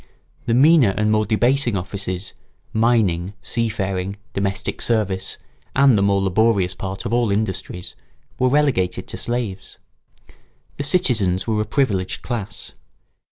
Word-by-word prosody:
The 115 Hz, -, +2 dB
meaner 135 Hz, -, +5 dB
and 105 Hz, 0 st, +2 dB
more 110 Hz, 0 st, +2 dB
debasing 120 Hz, 0 st, +2 dB
offices, 95 Hz, 0 st, -5 dB, 0.4 s
mining, 105 Hz, -6 st, +2 dB
sea 115 Hz, +2 st, -1 dB
faring, 95 Hz, -2 st, -3 dB, 0.2 s
domestic 100 Hz, 0 st, -2 dB
service, 100 Hz, -5 st, 0 dB, 0.4 s
and 135 Hz, -2 st, +5 dB
the 100 Hz, -, +2 dB
more 100 Hz, 0 st, +2 dB
laborious 95 Hz, -1 st, +2 dB
part 95 Hz, +3 st, -6 dB
of 115 Hz, -, -2 dB
all 120 Hz, -3 st, +2 dB
industries, 95 Hz, -3 st, -3 dB, 0.4 s
were 130 Hz, -, +3 dB
relegated 135 Hz, -10 st, +1 dB
to -, -, -6 dB
slaves. 115 Hz, -6 st, -3 dB, 1.0 s
The 145 Hz, -, -2 dB
citizens 115 Hz, -, +2 dB
were 110 Hz, -2 st, 0 dB
a -, -, -2 dB
privileged 100 Hz, -10 st, -1 dB
class. 105 Hz, -5 st, -5 dB
105 Hz, 130 wpm, -21 LUFS, 95-120 Hz, 1.0 s, meaner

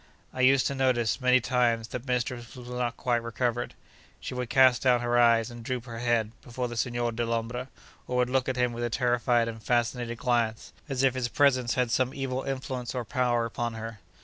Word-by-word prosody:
I 130 Hz, -, -3 dB
used 130 Hz, +1 st, +5 dB
to -, -, 0 dB
notice, 130 Hz, -2 st, +1 dB
many 125 Hz, 0 st, +5 dB
times, 120 Hz, -2 st, +1 dB
that 125 Hz, +2 st, -6 dB
mistress 125 Hz, -1 st, -2 dB
was 125 Hz, -1 st, -10 dB
not 125 Hz, -1 st, -2 dB
quite 120 Hz, -2 st, 0 dB
recovered. 120 Hz, +1 st, -2 dB, 0.4 s
She -, -, -6 dB
would 125 Hz, -1 st, -4 dB
cast 130 Hz, -2 st, +5 dB
down 125 Hz, -2 st, +3 dB
her 120 Hz, 0 st, 0 dB
eyes 115 Hz, 0 st, +4 dB
and 120 Hz, -1 st, -9 dB
droop 125 Hz, 0 st, -3 dB
her 115 Hz, -2 st, -7 dB
head, 120 Hz, -2 st, +1 dB
before 125 Hz, +1 st, -4 dB
the 120 Hz, -, -7 dB
Signor 120 Hz, 0 st, -1 dB
Dellombra, 115 Hz, +2 st, -2 dB, 0.4 s
or 125 Hz, -, -1 dB
would 125 Hz, 0 st, +2 dB
look 130 Hz, 0 st, +1 dB
at 130 Hz, -, -1 dB
him 125 Hz, -1 st, +1 dB
with 120 Hz, +1 st, -4 dB
a 120 Hz, -, 0 dB
terrified 120 Hz, 0 st, +2 dB
and 115 Hz, -1 st, -6 dB
fascinated 120 Hz, 0 st, 0 dB
glance, 120 Hz, -4 st, -1 dB, 0.2 s
as 135 Hz, -1 st, -1 dB
if 135 Hz, -2 st, +4 dB
his 130 Hz, -2 st, -1 dB
presence 130 Hz, -3 st, +2 dB
had 125 Hz, -2 st, +1 dB
some 130 Hz, +2 st, +1 dB
evil 130 Hz, -1 st, -2 dB
influence 130 Hz, -2 st, -4 dB
or 125 Hz, -2 st, -2 dB
power 120 Hz, -1 st, +1 dB
upon 115 Hz, 0 st, -3 dB
her. 110 Hz, -1 st, -7 dB
120 Hz, 205 wpm, -28 LUFS, 115-125 Hz, 0.4 s, used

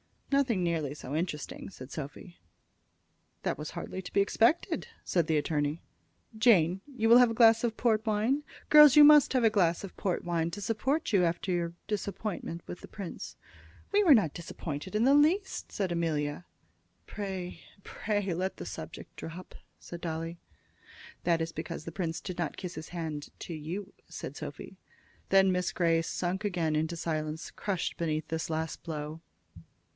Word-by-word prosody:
"Nothing 255 Hz, -9 st, +2 dB
nearly 160 Hz, -5 st, -1 dB
so 135 Hz, -2 st, -7 dB
interesting," 155 Hz, -1 st, -3 dB
said 130 Hz, -8 st, -11 dB
Sophy. 155 Hz, +4 st, -8 dB, 1.0 s
"That -, -, -1 dB
was 150 Hz, +1 st, -6 dB
hardly 190 Hz, -, -5 dB
to 180 Hz, -, -10 dB
be 200 Hz, -, +4 dB
expected," 230 Hz, +10 st, +2 dB, 0.2 s
said 170 Hz, -4 st, +1 dB
the 160 Hz, -, +2 dB
attorney. 150 Hz, +1 st, -1 dB, 0.5 s
"Jane, 195 Hz, -6 st, +4 dB
you 255 Hz, -6 st, -1 dB
will 235 Hz, -, +9 dB
have 245 Hz, -1 st, +6 dB
a -, -, -2 dB
glass 225 Hz, 0 st, +6 dB
of 230 Hz, -1 st, -2 dB
port 220 Hz, -2 st, +2 dB
wine? 225 Hz, +7 st, +1 dB, 0.3 s
Girls, 300 Hz, -3 st, +9 dB
you 300 Hz, -, +10 dB
must 295 Hz, -2 st, +8 dB
have 255 Hz, -2 st, +2 dB
a 225 Hz, -, +6 dB
glass 175 Hz, -5 st, +2 dB
of 195 Hz, -, -8 dB
port 185 Hz, -3 st, -1 dB
wine 170 Hz, -1 st, 0 dB
to 205 Hz, +4 st, -6 dB
support 265 Hz, +9 st, 0 dB
you 190 Hz, -3 st, +5 dB
after 175 Hz, +3 st, -1 dB
your 170 Hz, -1 st, -1 dB
disappointment 200 Hz, -4 st, -4 dB
with 175 Hz, -, -7 dB
the -, -, -11 dB
prince." 195 Hz, -5 st, -7 dB, 0.6 s
"We 415 Hz, +1 st, +4 dB
were 320 Hz, -8 st, +8 dB
not 180 Hz, -10 st, +2 dB
disappointed 170 Hz, +1 st, -6 dB
in 215 Hz, -, +3 dB
the 270 Hz, +3 st, +5 dB
least," 325 Hz, +8 st, +2 dB
said 190 Hz, -3 st, -2 dB
Amelia. 160 Hz, -2 st, -1 dB, 0.6 s
"Pray, 190 Hz, -3 st, -5 dB, 0.2 s
pray, 205 Hz, -3 st, -2 dB
let 185 Hz, +3 st, -2 dB
the -, -, -6 dB
subject -, -, -8 dB
drop," 170 Hz, +3 st, -8 dB, 0.3 s
said 170 Hz, -1 st, -9 dB
Dolly. 165 Hz, 0 st, -4 dB, 0.9 s
"That 170 Hz, -1 st, +3 dB
is 165 Hz, 0 st, -2 dB
because 160 Hz, +1 st, -6 dB
the 165 Hz, -, -6 dB
prince 165 Hz, -2 st, -3 dB
did 180 Hz, -2 st, -6 dB
not 170 Hz, -, -2 dB
kiss 180 Hz, -2 st, -5 dB
his 155 Hz, 0 st, -8 dB
hand 160 Hz, -4 st, -5 dB
to 170 Hz, -, -6 dB
you," 175 Hz, +6 st, -6 dB
said -, -, -7 dB
Sophy. -, -, -8 dB, 0.5 s
Then 195 Hz, -1 st, +5 dB
Miss 180 Hz, -1 st, 0 dB
Grey 165 Hz, -2 st, +2 dB
sunk 180 Hz, +4 st, -2 dB
again 170 Hz, -6 st, 0 dB
into 160 Hz, +2 st, 0 dB
silence, 155 Hz, -1 st, -3 dB
crushed 195 Hz, -4 st, -3 dB
beneath 160 Hz, -1 st, -2 dB
this 160 Hz, 0 st, -2 dB
last 160 Hz, 0 st, -3 dB
blow. 155 Hz, -1 st, -5 dB
175 Hz, 170 wpm, -30 LUFS, 160-210 Hz, 1.0 s, you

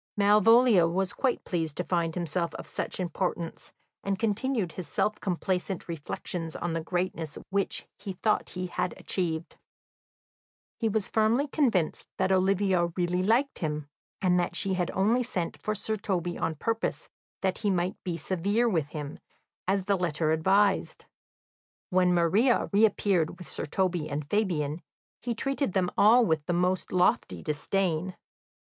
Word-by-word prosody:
Malvolio 210 Hz, -1 st, +6 dB
was 185 Hz, +2 st, 0 dB
quite 260 Hz, -3 st, 0 dB
pleased 160 Hz, -4 st, -2 dB
to 180 Hz, -, 0 dB
find 170 Hz, -2 st, -1 dB
himself 170 Hz, 0 st, -2 dB
of -, -, -7 dB
such -, -, -4 dB
importance, 175 Hz, -1 st, -3 dB, 0.3 s
and 195 Hz, -1 st, -1 dB
continued 220 Hz, -2 st, 0 dB
his 175 Hz, 0 st, -7 dB
self 210 Hz, +8 st, 0 dB
complacent 185 Hz, 0 st, -2 dB
reflections 165 Hz, +1 st, -4 dB
on 175 Hz, -1 st, -2 dB
the 165 Hz, -, -1 dB
greatness 170 Hz, -2 st, -3 dB
which 200 Hz, 0 st, -1 dB
he 200 Hz, -1 st, -5 dB
thought 210 Hz, +4 st, 0 dB
he 180 Hz, -, -2 dB
had 180 Hz, 0 st, -2 dB
achieved. 165 Hz, -3 st, -3 dB, 1.2 s
He 225 Hz, -, +1 dB
was 210 Hz, -1 st, +1 dB
firmly 225 Hz, +6 st, +2 dB
convinced 235 Hz, -, +1 dB
that 190 Hz, 0 st, +1 dB
Olivia 190 Hz, -1 st, +3 dB
really 180 Hz, 0 st, +1 dB
liked 235 Hz, +8 st, +2 dB
him, 150 Hz, -2 st, -3 dB, 0.3 s
and 180 Hz, -1 st, +4 dB
that 175 Hz, -, -1 dB
she 195 Hz, -, 0 dB
had 180 Hz, -1 st, 0 dB
only 220 Hz, +6 st, +3 dB
sent 185 Hz, -8 st, -3 dB
for 215 Hz, -, -1 dB
Sir 220 Hz, +1 st, -2 dB
Toby 180 Hz, -4 st, -2 dB
on 160 Hz, -, -2 dB
purpose 225 Hz, +8 st, -2 dB, 0.4 s
that 190 Hz, -1 st, 0 dB
he 210 Hz, -, 0 dB
might 180 Hz, -1 st, -1 dB
be 175 Hz, -2 st, -2 dB
severe 200 Hz, +8 st, 0 dB
with 165 Hz, -10 st, +1 dB
him, 150 Hz, -1 st, -6 dB, 0.5 s
as 195 Hz, 0 st, +1 dB
the 200 Hz, +1 st, +2 dB
letter 160 Hz, -3 st, 0 dB
advised. 195 Hz, +5 st, +2 dB, 0.9 s
When 180 Hz, -1 st, +4 dB
Maria 190 Hz, +9 st, +3 dB
reappeared 200 Hz, -5 st, +2 dB
with 180 Hz, -, -10 dB
Sir -, -, -2 dB
Toby 175 Hz, -1 st, 0 dB
and 145 Hz, 0 st, -4 dB
Fabian, 170 Hz, -6 st, 0 dB, 0.4 s
he 240 Hz, -1 st, -2 dB
treated 275 Hz, -3 st, -1 dB
them 185 Hz, -2 st, +1 dB
all 230 Hz, +4 st, +6 dB
with 160 Hz, -5 st, +1 dB
the 175 Hz, -, +1 dB
most 180 Hz, +1 st, 0 dB
lofty 95 Hz, -, +1 dB
disdain. 175 Hz, +3 st, -1 dB
185 Hz, 150 wpm, -28 LUFS, 170-205 Hz, 1.2 s, Malvolio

